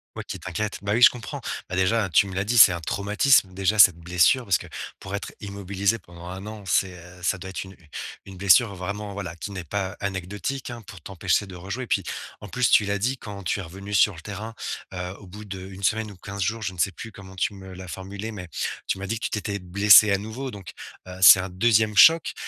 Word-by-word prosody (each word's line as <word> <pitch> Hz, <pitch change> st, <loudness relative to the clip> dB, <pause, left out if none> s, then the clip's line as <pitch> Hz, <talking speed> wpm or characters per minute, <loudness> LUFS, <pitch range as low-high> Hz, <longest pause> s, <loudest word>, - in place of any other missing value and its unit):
Ouais, -, -, -5 dB
qui -, -, -7 dB
t'inquiète, 105 Hz, -1 st, -4 dB
bah, 100 Hz, +1 st, -1 dB
oui, 120 Hz, -, +1 dB
je -, -, +10 dB
comprends, 115 Hz, -5 st, -7 dB, 0.3 s
bah, 95 Hz, -, -3 dB
déjà, 95 Hz, +2 st, +1 dB
tu 85 Hz, -, +4 dB
me 95 Hz, -, -8 dB
l'as 95 Hz, +1 st, -1 dB
dit, 120 Hz, +4 st, 0 dB
c'est 100 Hz, -3 st, +9 dB
un 85 Hz, -, -3 dB
traumatisme, 100 Hz, -, +2 dB
déjà, 100 Hz, +3 st, 0 dB
cette 90 Hz, -4 st, +8 dB
blessure, 90 Hz, +9 st, +2 dB
parce 95 Hz, -, +3 dB
que -, -, -11 dB, 0.3 s
pour 95 Hz, -, -9 dB
être 100 Hz, -, -6 dB
immobilisé 100 Hz, +1 st, -2 dB
pendant 85 Hz, -1 st, -14 dB
1 95 Hz, +3 st, -7 dB
an, 105 Hz, -1 st, -8 dB
c'est, 90 Hz, -1 st, 0 dB
heu, 90 Hz, +1 st, -14 dB
ça 90 Hz, +2 st, 0 dB
doit 95 Hz, +1 st, -8 dB
être 95 Hz, -, -5 dB
une 95 Hz, 0 st, -13 dB, 0.5 s
une 95 Hz, -, -11 dB
blessure 100 Hz, +3 st, +4 dB
vraiment 100 Hz, +2 st, -5 dB
voilà, 95 Hz, -5 st, -6 dB
qui 90 Hz, +4 st, -7 dB
n'est 95 Hz, -3 st, -6 dB
pas 95 Hz, +3 st, -3 dB
anecdotique, 100 Hz, +7 st, -4 dB
hein, 120 Hz, -1 st, -8 dB
pour 95 Hz, -4 st, -11 dB
t'empêcher 95 Hz, +2 st, -1 dB
de 95 Hz, -2 st, -11 dB
rejouer, 95 Hz, +9 st, -5 dB
puis -, -, 0 dB, 0.4 s
en 105 Hz, -, -8 dB
plus, 125 Hz, +2 st, +1 dB
tu 105 Hz, -, +6 dB
l'as 100 Hz, 0 st, -1 dB
dit 125 Hz, +7 st, -1 dB
quand 100 Hz, -2 st, -8 dB
tu 90 Hz, -, -1 dB
es -, -, -3 dB
revenu 100 Hz, +4 st, -9 dB
sur 100 Hz, -1 st, +4 dB
le 80 Hz, -, -11 dB
terrain, 110 Hz, +2 st, -7 dB, 0.4 s
heu, 90 Hz, 0 st, -5 dB
au 100 Hz, -, -14 dB
bout 105 Hz, +4 st, -10 dB
d' 100 Hz, -, -7 dB, 0.2 s
1 95 Hz, +1 st, -11 dB
semaine 110 Hz, +2 st, 0 dB
ou -, -, -12 dB
15 100 Hz, +2 st, -7 dB
jours, 110 Hz, +4 st, -1 dB
je 95 Hz, -, -3 dB
ne 90 Hz, -, -13 dB
sais 95 Hz, -, +2 dB
plus 115 Hz, +5 st, -9 dB
comment 95 Hz, -1 st, -13 dB
tu 100 Hz, -, -1 dB
me 95 Hz, -1 st, -11 dB
l'as 90 Hz, 0 st, -9 dB
formulé, 95 Hz, +5 st, -7 dB
mais 90 Hz, -4 st, -8 dB, 0.4 s
tu -, -, -1 dB
m'as 95 Hz, -, -6 dB
dit 115 Hz, +3 st, -2 dB
que -, -, -4 dB
tu -, -, -1 dB
t'étais 105 Hz, -1 st, -3 dB
blessé 100 Hz, +3 st, +6 dB
à 100 Hz, -, +3 dB
nouveau, 110 Hz, +6 st, -6 dB
donc, 100 Hz, -5 st, -9 dB, 0.4 s
heu, 90 Hz, 0 st, -9 dB
c'est 95 Hz, -, +10 dB
un 95 Hz, +1 st, -4 dB
2e 110 Hz, +2 st, +2 dB
choc 160 Hz, +10 st, +6 dB
100 Hz, 250 wpm, -24 LUFS, 95-105 Hz, 0.5 s, je